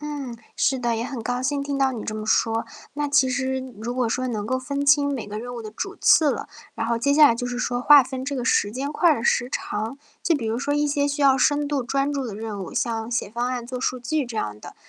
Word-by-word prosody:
嗯， 290 -5 -5 0.2
是 265 - +2
的， 235 -2 0
也 230 - -2
很 255 -3 -5
高 245 +2 -2
兴 280 +2 0
听 280 0 -3
到 270 -1 +2
你 230 -4 -5
这 - - -3
么 215 0 -5
说。 225 +1 +2 0.3
那 295 0 -1
其 280 -2 +4
实 260 0 -1 0.2
如 240 +2 -3
果 250 -2 0
说 255 +3 -1
能 220 -4 -3
够 260 +3 0
分 280 +2 -3
清 285 0 +4
每 235 - -5
个 210 +1 -5
任 245 +2 -6
务 235 - -6
的 215 - -7
主 215 - -5
次 310 -3 +5
了， 270 - -4 0.3
然 225 - -3
后 235 0 0
接 280 +4 +2
下 300 0 +8
来 230 - +3
就 245 +1 -3
是 245 0 -4
说 245 -1 -1
划 290 +2 +8
分 260 0 -6
这 280 +1 -3
个 250 -3 -3
时 205 -5 +2
间 270 +4 -3
块 340 +1 +4
儿 - - 0
的 - - -5
时 245 +1 +2
长， 220 0 -3 0.3
就 335 - +2
比 285 - -2
如 225 +1 -1
说 285 +2 -1
一 295 0 +2
些 285 0 +1
需 285 0 -1
要 270 -1 +5
深 290 +2 +2
度 285 -2 0
专 275 +3 0
注 275 -2 -2
的 215 - -6
任 210 -2 -5
务， - - -9
像 225 -1 -1
写 230 -4 -1
方 240 +2 -2
案、 250 -2 -3
做 250 +1 -6
数 255 0 -1
据 280 +3 -1
这 235 -2 -7
样 105 - -3
的。 - - -11
255 Hz, 300 characters per minute, -24 LUFS, 230-280 Hz, 0.3 s, 下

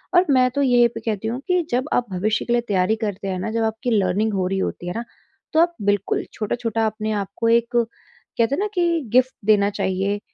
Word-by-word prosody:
और 355 +1 +6
मैं 255 -1 +4
तो 280 - -1
यह 245 -2 +5
कहती 220 -1 -3
हूँ 240 +3 -3
कि 360 -1 +3
जब 255 +4 0
आप 245 - +2
भविष्य 210 +4 0
के 240 - 0
लिए 240 - +3
तैयारी 195 +2 +2
करते 200 -2 -3
हैं 185 -1 -2
ना, 200 - -3
जब 225 0 0
आपकी 220 +2 -2
लर्निंग 210 +1 +1
हो 185 -2 0
रही 195 +1 -1
होती 175 -2 -3
है 175 - -3
ना, 230 - -3 0.5
तो 315 - +4
आप 345 0 +2
बिल्कुल 205 -1 0
छोटा-छोटा 225 0 -1
अपने 215 0 -3
आप 200 -2 -1
को 230 - +1
एक 235 0 +3
कहते 230 +1 -2
हैं - - -4
ना 415 - 0
कि 340 -2 +2
गिफ्ट 255 +1 +4
देना 205 -1 +4
चाहिए 195 +1 -1
225 Hz, 225 wpm, -22 LUFS, 205-245 Hz, 0.5 s, और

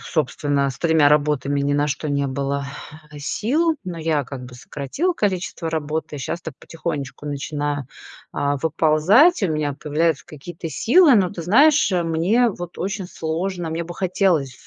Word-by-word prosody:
собственно, 145 -2 0
с 125 - -10
тремя 160 -2 +4
работами 145 -1 +1
ни 140 0 0
на 145 +1 +2
что 150 +1 -3
не 140 -1 0
было 140 +1 -2 0.5
сил, 295 - 0
но 175 -2 -5
я 155 -3 0
как 125 0 -8
бы 125 0 -11
сократила 145 - -3
количество 185 - -2
работы. 155 -1 -3
Щас 155 +5 -4
так 160 -5 -8
потихонечку 150 -4 -5
начинаю, 145 -1 -3 0.5
а, 145 0 0
выползать, 165 - +4
у 190 - +2
меня 150 -2 -1
появляются 155 0 0
какие-то 165 +2 -8
силы, 295 - +5
но 190 -5 +3
ты 175 -3 -6
знаешь, 275 - +4
мне 175 +7 +2
вот 175 -3 -8
очень 195 0 -3
сложно, 170 +1 -3
мне 165 +1 -3
бы 175 +1 -8
хотелось 180 -7 +1
160 Hz, 155 wpm, -21 LUFS, 145-180 Hz, 0.5 s, силы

